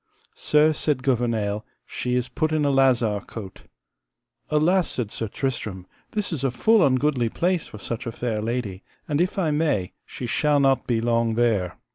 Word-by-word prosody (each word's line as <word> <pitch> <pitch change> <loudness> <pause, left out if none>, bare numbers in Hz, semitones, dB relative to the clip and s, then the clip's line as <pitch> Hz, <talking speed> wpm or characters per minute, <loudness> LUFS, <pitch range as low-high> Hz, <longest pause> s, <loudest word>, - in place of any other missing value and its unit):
Sir, 150 +1 +3
said 145 -4 -1
Gouvernail, 115 -5 0 0.2
she 125 0 -2
is 125 0 0
put 155 +5 -1
in 155 -2 +1
a 140 - +3
lazar 125 -6 +3
cote. 100 -5 -9 0.9
Alas, 170 +4 +3
said 115 -5 -3
Sir 115 - -3
Tristram, 105 -6 -3 0.3
this 210 -4 -1
is 140 -4 -4
a 135 - +2
full 220 - +3
ungoodly 130 -3 +2
place 180 -1 0
for - - -10
such 115 +3 -5
a - - -2
fair 115 -2 -2
lady, 110 -4 -3 0.3
and 145 +2 +1
if 180 +2 -1
I 170 -5 +1
may 145 - 0 0.2
she 125 - -6
shall 145 +4 +2
not 135 -1 +2
be 115 -2 +1
long 115 -1 +1
there. 110 -7 +1
125 Hz, 175 wpm, -24 LUFS, 115-150 Hz, 0.9 s, Sir